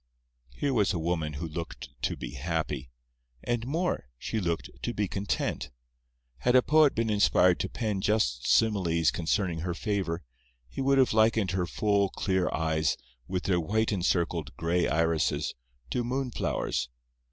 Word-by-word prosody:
Here 140 -2 0
was 105 -5 +2
a - - -1
woman 80 -2 -1
who 80 +4 -4
looked 85 +2 -6
to - - -1
be - - -6
happy. 75 -2 -3 0.5
And 120 0 -1
more—she 120 - -2
looked 85 -4 -2
to 120 - -3
be 105 -1 0
content. 100 +2 -2 0.7
Had 125 +1 +2
a 125 - +7
poet 155 -2 +5
been 115 -1 +1
inspired 90 -3 +4
to - - -2
pen 105 -4 -2
just 95 - +1
similes 90 -7 +3
concerning 85 0 0
her 85 +1 -2
favour, 95 -5 -2 0.4
he 65 - -5
would 135 +1 +3
have 130 -4 +4
likened 110 -3 +3
her 90 -1 0
full, 100 0 +1
clear 95 -2 0
eyes, 80 -1 +1 0.3
with 90 -1 -2
their 90 -2 +2
white 110 +7 0
encircled, 85 -5 0
gray 85 +2 +1
irises, 80 -2 +1 0.4
to 125 - 0
moonflowers. 125 - -1
95 Hz, 150 wpm, -29 LUFS, 80-110 Hz, 0.7 s, a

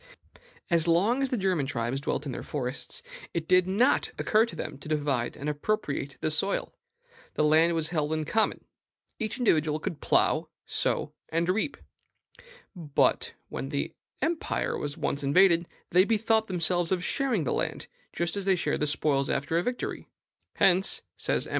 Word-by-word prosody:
As 170 -1 +3
long 200 +10 +3
as 270 - 0
the 250 - 0
German 185 -8 0
tribes 130 0 -2
dwelt 145 - -2
in 140 - -3
their - - -5
forests, 130 - -3 0.3
it 165 -1 -2
did 185 0 +4
not 220 +8 +3
occur 220 +2 +3
to - - -9
them 150 -3 -6
to 145 - -9
divide 145 -5 -1
and 145 - -5
appropriate 145 -3 -2
the 155 - 0
soil. 195 +6 0 0.6
The - - +2
land 160 +3 +4
was 160 -1 -1
held 155 -3 -1
in 155 -1 -1
common: 220 +7 0 0.5
each 220 0 -2
individual 155 - +2
could 155 0 -5
plow, - - +2 0.2
sow, - - -1 0.2
and 165 +1 0
reap. 220 +9 0 1.0
But, 155 -5 +1 0.2
when 135 - -5
the 140 -1 -2 0.3
empire 330 0 -1
was 145 -1 -4
once 140 - -1
invaded, 170 +4 +4 0.2
they 180 +2 +6
bethought 220 +1 +2
themselves 175 -1 +1
of 180 -1 0
sharing 250 - 0
the 135 - -1
land, - - -2 0.3
just 170 +1 -1
as 200 -1 -3
they 195 -1 +4
shared 150 -3 -1
spoils 140 -2 +1
after 155 +4 0
a - - +1
victory. 245 +6 -4 0.5
"Hence," 190 +1 +3
says - - 0
M. - - -10
170 Hz, 165 wpm, -28 LUFS, 150-195 Hz, 1.0 s, they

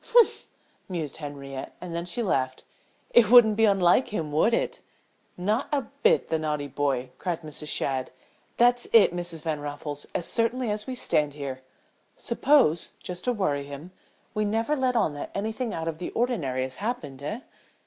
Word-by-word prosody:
"H'm!" 470 -1 +6 0.6
mused 165 -6 -4
Henriette, 140 -3 -7
and 180 -2 -7
then 170 0 -2
she 180 +7 -3
laughed. 130 -9 -1 0.5
"It 230 -4 +6
wouldn't 230 -3 +8
be 225 +1 +4
unlike 195 +3 +4
him, 160 -8 -3
would 155 +10 +3
it?" - - 0 0.6
"Not 210 +8 0
a 285 -2 +1 0.2
bit, - - +3
the 160 - +1
naughty 150 -2 -2
boy!" 135 -2 -1
cried 175 -3 -3
Mrs. 150 0 -5
Shadd. 130 -3 -1 0.5
"That's 245 0 +4
it, 215 -6 +7
Mrs. 175 -3 -2
Van 155 -2 -1
Raffles, 145 0 -5
as 175 - 0
certainly 235 0 +1
as 210 0 -2
we 260 - -3
stand 150 - 0
here. 135 -3 -5 0.6
Suppose, 240 - +2
just 180 0 -6
to 250 - +2
worry 150 -11 -1
him, 145 +5 -9 0.4
we 215 -1 0
never 225 +7 0
let 260 -3 +1
on 215 -10 +2
that 145 - -6
anything 220 +4 -2
out 165 -3 -4
of 165 -1 -3
the 180 - -4
ordinary 160 - 0
has 130 0 -5
happened, 160 - -4
eh?" 215 - -4
175 Hz, 175 wpm, -26 LUFS, 145-230 Hz, 0.6 s, wouldn't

